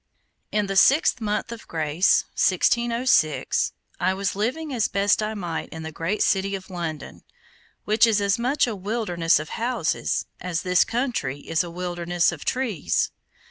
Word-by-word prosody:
In 210 -1 +1
the 195 0 -3
sixth 265 +4 +4
month 210 +1 -2
of 230 -1 -9
Grace, 160 +2 +2
1606, 235 - +2 0.3
I 190 - +1
Was 195 0 -2
living 265 +9 -2
as 235 -4 +1
best 200 +1 +2
I 215 +1 -2
might 175 -5 -4
in 160 0 -8
that 160 - -6
great 165 +6 -1
city 195 0 +1
of 190 0 -9
London, 160 -5 -5 0.6
which 215 +2 +4
is 215 -2 +3
as 200 +2 +1
much 265 +5 +2
a 235 -3 -3
wilderness 185 -4 +1
of 150 +1 -5
houses, 235 -8 -1
as 180 -2 -3
this 180 -1 +4
country 230 - -2
is 165 +4 0
a 175 - -7
wilderness 175 0 0
of 165 -4 -8
trees. 250 - 0
195 Hz, 160 wpm, -24 LUFS, 170-230 Hz, 0.6 s, sixth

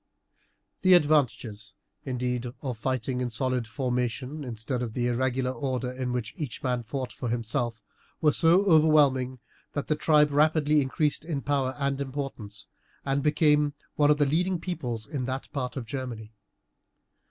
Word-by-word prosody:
The 185 -1 +7
advantages, 120 - +1 0.3
indeed, 125 -2 -2 0.2
of 130 -3 -2
fighting 130 +1 -1
in 125 - -1
solid 125 0 0
formation, 125 +4 -2
instead 120 +1 -3
of 115 -3 -4
the 120 0 -1
irregular 125 +1 0
order 130 0 -2
in 125 -1 -3
which 125 -3 -3
each 145 -7 -6
man 125 -1 0
fought 130 +2 -5
for 125 - -4
himself, 115 0 -2 0.4
were 150 -2 +4
so 170 +6 +4
overwhelming 150 -7 +4 0.4
that 145 - -3
the 155 - +3
tribe 150 -1 +4
rapidly 150 0 +3
increased 145 +3 0
in 160 -4 -3
power 135 -2 0
and 140 -1 -1
importance, 130 -7 -6 0.4
and 140 0 +1
became 150 -1 +3 0.2
one 145 -1 +4
of 150 - +5
the 145 - +3
leading 175 +5 +1
peoples 125 -11 -4
in 130 +1 -4
that 130 +1 -4
part 130 -1 -3
of 125 - -4
Germany. 115 -4 -6
130 Hz, 155 wpm, -27 LUFS, 125-150 Hz, 0.4 s, The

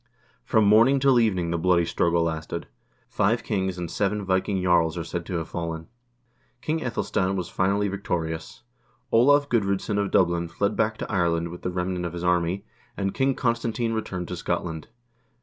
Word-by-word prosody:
From 110 - +3
morning 115 +7 +5
till 135 -2 +4
evening 95 -7 +1
the 85 - -1
bloody 85 -1 +3
struggle 85 0 +1
lasted. 80 +1 -3 0.4
Five 115 +4 +1
kings 95 -4 -1
and 85 -2 -5
seven 105 0 -1
Viking 95 +1 0
jarls 90 -2 +2
are 85 - -2
said 85 +1 -5
to 95 - -3
have 80 -1 -2
fallen. 80 -1 -5 0.7
King 155 +5 -1
iEthelstan 100 -7 -1
was 90 -2 -3
finally 100 +2 +1
victorious. 80 -5 -4 0.5
Olav 145 +5 +5
Gudr0dsson 100 -2 0
of 100 -1 0
Dublin 85 -2 +2
fled 100 +5 -1
back 110 0 0
to - - -5
Ireland 85 -3 +1
with 90 +1 -9
the - - -2
remnant 90 0 -2
of 85 - -8
his 85 0 -5
army, 90 +1 +1 0.3
and 100 -1 -1
King 135 0 +1
Constantine 115 -1 -1
returned 95 -5 -3
to 90 - -3
Scotland. 85 -2 -3
95 Hz, 170 wpm, -25 LUFS, 85-105 Hz, 0.7 s, morning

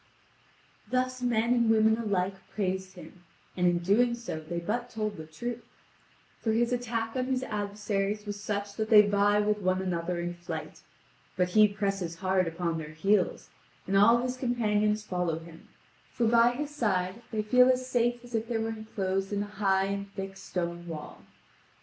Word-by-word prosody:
Thus 255 +1 0
men 235 -1 +2
and 235 -2 +2
women 220 0 +5
alike 200 -4 0 0.2
praised 190 -1 -2
him, 180 0 -13 0.3
and 180 -1 +2
in 175 0 +3
doing 215 +8 +3
so 235 -9 -5
they 160 +2 -6
but 210 +8 -2
told 215 -2 -3
the 160 -1 -9
truth. 235 +10 -5 0.8
For 220 - 0
his 240 +2 +2
attack 230 -2 -2
on 255 -1 0
his 260 -1 0
adversaries 205 -1 -2
was 205 -1 -5
such 205 -1 -3
that 220 0 -1
they 210 -2 +9
vie 205 0 +3
with 210 0 +1
one 185 -1 +1
another 175 -1 -2
in 175 0 -3
flight. 175 0 -7 0.6
But 180 -1 +2
he 215 +3 +6
presses 195 -4 -2
hard 185 0 +1
upon 165 0 -2
their 155 -1 -8
heels, 195 +3 +1 0.3
and 195 - -1
all 215 +4 +7
his 250 +1 -2
companions 215 -4 +1
follow 180 -5 -1
him, 165 0 -12 0.4
for 235 - 0
by 235 +1 +5
his 290 +3 -4
side 190 -4 0
they 215 -2 -2
feel 250 +4 +5
as 255 0 +2
safe 240 -1 +1
as 245 0 -13
if 225 0 -1
they 235 -1 -1
were 225 0 -1
enclosed 195 -3 -3
in 205 0 0
a 205 0 -11
high 190 -1 +3
and 200 0 -4
thick 195 0 -5
stone 175 -2 -4
wall. 155 -3 -7
205 Hz, 180 wpm, -29 LUFS, 185-230 Hz, 0.8 s, they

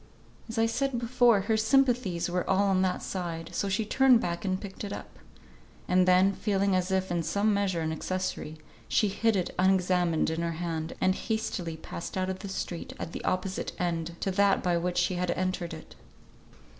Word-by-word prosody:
As 225 - -5
I 225 - +4
said 265 +3 0
before, 235 -3 +3
her 220 +3 +1
sympathies 235 -6 +2
were 180 0 -2
all 200 +1 +3
on 185 -1 +3
that 185 -1 0
side, 170 -3 -4
so 200 - -1
she 210 +3 0
turned 260 +2 +5
back 170 -1 -3
and 185 -1 -1
picked 195 0 -8
it 200 - -5
up; - - -8 0.7
and 185 0 +3
then 185 +2 +5
feeling 195 -1 +1
as 185 0 0
if 190 -1 0
in 170 -1 +1
some 200 +6 +1
measure 195 -4 0
an 160 0 -1
accessory, 160 -2 -3 0.3
she 210 - +2
hid 225 +3 +1
it 185 -3 -1
unexamined 180 -3 +2
in 160 +1 -2
her 170 0 -1
hand, 165 -1 -3
and 185 - +3
hastily 185 -6 -3
passed 170 +3 -7
out 185 0 0
of 190 - -6
the 200 - -7
street 175 -3 -5
at - - -5
the - - -6
opposite 185 +1 -2
end 170 -1 -2
to 195 - 0
that 200 +1 +3
by 175 -1 +2
which 175 +1 -1
she 175 +1 +2
had 180 0 -1
entered 185 -1 -1
it. 160 -1 -10
185 Hz, 195 wpm, -28 LUFS, 175-200 Hz, 0.7 s, turned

